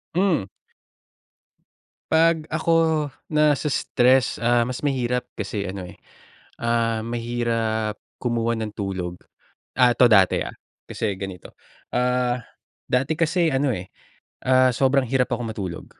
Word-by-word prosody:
Mm. 175 - +2 1.6
'Pag 160 -1 +3
ako 160 -1 +2 0.2
nase-stress 140 -4 +2
ah, 120 +1 +3
mas 125 +1 -4
mahirap, 125 -3 -1
kasi 100 -1 -4
ano, 95 0 -5
eh, 90 - -11 0.6
ah, 115 -1 +1
mahirap 115 -2 -2 0.2
kumuha 115 -1 0
ng 110 -1 -4
tulog. 95 -3 -4 0.6
Ah, 125 -1 +5
'to 125 - +6
dati, 95 -4 +5
ah, - - -6 0.4
kasi 100 - -2
ganito, 95 -3 -8 0.4
ah, 125 0 +1 0.5
dati 135 +5 +1
kasi 170 +2 +1
ano, 135 0 +1
eh, 90 0 -7 0.6
ah, 130 0 +5
sobrang 135 +1 +2
hirap 130 +1 +1
ako 120 0 -1
matulog. 95 -6 -5
120 Hz, 115 wpm, -23 LUFS, 110-135 Hz, 1.6 s, to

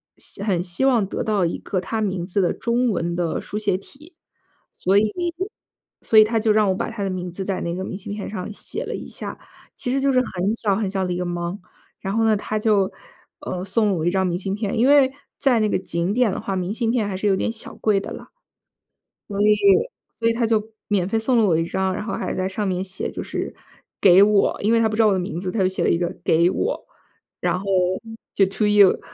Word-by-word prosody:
希 200 - -6
很 185 -5 +1
希 180 +8 0
望 240 -7 +3
得 - - -3
到 205 -4 +1
一 170 - -1
个 190 - -2
他 220 +4 -3
名 190 -4 -1
字 195 +2 0
的 175 - +1
中 240 +1 0
文 170 -2 -1
的 175 -2 -1
书 205 - -6
写 205 -3 +1
体。 300 - -15 0.6
所 190 +2 0
以 210 0 +3 0.9
所 220 - +5
以 215 - +10
他 225 +1 0
就 220 0 +2
让 210 -1 +3
我 190 - +1
把 - - -3
他 220 - -6
的 195 - -1
名 180 -1 -4
字 190 +2 -5
在 195 -1 -2
那 170 - -2
个 185 - -4
明 190 - -5
信 200 +1 -6
片 205 -1 -5
上 210 0 -5
写 - - -4
了 - - -4
一 - - -7
下， - - -7 0.4
其 245 - -3
实 270 - +1
就 275 0 +2
是 255 - +5
很 195 -3 -1
小 205 -4 +1
很 210 -1 -1
小 190 -1 -1
的 180 - -2
一 175 - -3
个 180 - -2
忙。 175 +2 -3 0.4
然 195 +2 -3
后 225 - +2
呢， 220 -1 +4
他 215 +1 -3
就， 210 -3 +2 0.5
呃， 180 0 -4
送 210 +3 +1
了 195 - +2
我 160 -1 -2
一 - - +4
张 190 0 +1
明 175 0 -1
信 195 +1 -3
片， 210 +1 -2
因 250 - +4
为 280 -2 +6 0.3
在 255 -5 +3
那 215 - +2
个 - - +1
景 170 +1 -2
点 240 -3 +3
的 - - -3
话， 195 - -3
明 185 +1 -2
信 230 -1 0
片 230 -4 0
还 190 -2 -3
是 200 - -4
有 195 - +4
点 205 - -1
小 225 - -8
贵 210 -3 +2
的 - - -7
了。 - - -9 1.0
所 200 - -4
以 210 0 +5 0.5
所 230 - -2
以 - - +2
他 230 0 0
就 220 -1 0 0.2
免 195 -4 +1
费 225 +3 0
送 240 +2 +2
了 225 - +4
我 175 -5 +3
一 165 - +1
张， 190 +2 -1
然 - - -4
后 - - -3
还 - - -3
在 185 0 -1
上 205 +1 -2
面 185 0 -1
写 185 0 -3
就 - - -5
是 - - -4 0.5
给 190 -1 +7
我。 210 -1 +3
因 215 +3 +2
为 230 - +4
他 220 - +3
不 215 - -3
知 225 - +3
道 220 - +5
我 205 - +4
的 190 - 0
名 180 -2 -4
字， 185 0 -3
他 225 - -2
就 185 - +3
写 190 - -2
了 - - +3
一 170 - +3
个 175 0 -2
“给 170 +2 +4
我“， 465 - -2 0.5
然 - - 0
后 195 - -8 0.7
就 195 - +4
to 210 +2 0
you。 205 -2 +5
200 Hz, 285 characters per minute, -22 LUFS, 185-220 Hz, 1.0 s, 以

